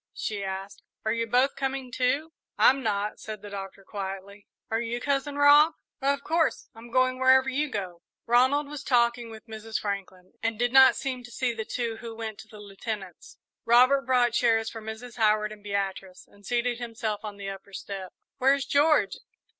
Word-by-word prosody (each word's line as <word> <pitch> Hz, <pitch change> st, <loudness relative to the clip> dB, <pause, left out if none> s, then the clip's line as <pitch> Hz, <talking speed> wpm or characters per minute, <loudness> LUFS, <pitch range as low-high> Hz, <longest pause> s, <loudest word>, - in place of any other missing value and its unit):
she 205 Hz, -2 st, -3 dB
asked; 195 Hz, +1 st, -6 dB, 0.2 s
"are 220 Hz, -, +2 dB
you 230 Hz, 0 st, -1 dB
both 255 Hz, +4 st, +2 dB
coming, 270 Hz, -2 st, -3 dB
too?" 275 Hz, +6 st, 0 dB, 0.2 s
"I'm 270 Hz, +1 st, +5 dB
not," 210 Hz, -2 st, -1 dB
said 215 Hz, -2 st, -8 dB
the 205 Hz, -, -9 dB
Doctor, 195 Hz, 0 st, -7 dB
quietly. 195 Hz, 0 st, -7 dB, 0.2 s
"Are 225 Hz, +1 st, +1 dB
you, 235 Hz, +1 st, -3 dB
Cousin 280 Hz, +2 st, -1 dB
Rob?" 290 Hz, +2 st, +6 dB, 0.3 s
"Of 280 Hz, +1 st, +1 dB
course 325 Hz, 0 st, 0 dB
I'm 225 Hz, +1 st, -12 dB
going 255 Hz, +1 st, +2 dB
wherever 260 Hz, 0 st, +5 dB
you 285 Hz, +2 st, -1 dB
do." 185 Hz, -5 st, -4 dB, 0.3 s
Ronald 260 Hz, +5 st, +3 dB
was 295 Hz, -1 st, -7 dB
talking 235 Hz, -2 st, +2 dB
with 220 Hz, -1 st, -11 dB
Mrs. 220 Hz, -1 st, -5 dB
Franklin, 190 Hz, -3 st, -5 dB
and 225 Hz, -1 st, -1 dB
did 245 Hz, +2 st, 0 dB
not 265 Hz, 0 st, +8 dB
seem 255 Hz, -3 st, -4 dB
to 240 Hz, -, -13 dB
see 245 Hz, 0 st, -1 dB
the 220 Hz, -1 st, -5 dB
two 230 Hz, -1 st, -3 dB
who 230 Hz, -1 st, -8 dB
went 220 Hz, -2 st, -6 dB
to 220 Hz, -, -11 dB
the 215 Hz, -1 st, -13 dB
Lieutenant's. 200 Hz, -2 st, -7 dB, 0.3 s
Robert 255 Hz, +3 st, +5 dB
brought 245 Hz, -2 st, +3 dB
chairs 225 Hz, -2 st, +2 dB
for 225 Hz, -, -8 dB
Mrs. 220 Hz, +2 st, -8 dB
Howard 215 Hz, -1 st, +2 dB
and 215 Hz, -1 st, -11 dB
Beatrice 195 Hz, -2 st, -4 dB
and 200 Hz, -1 st, -17 dB
seated 240 Hz, 0 st, 0 dB
himself 225 Hz, -3 st, -4 dB
on 210 Hz, -2 st, -7 dB
the 195 Hz, -1 st, -5 dB
upper 195 Hz, +1 st, -11 dB
step. 190 Hz, -1 st, -7 dB, 0.3 s
"Where's 270 Hz, +1 st, +3 dB
George?" 295 Hz, +2 st, +3 dB
230 Hz, 185 wpm, -27 LUFS, 205-260 Hz, 0.3 s, not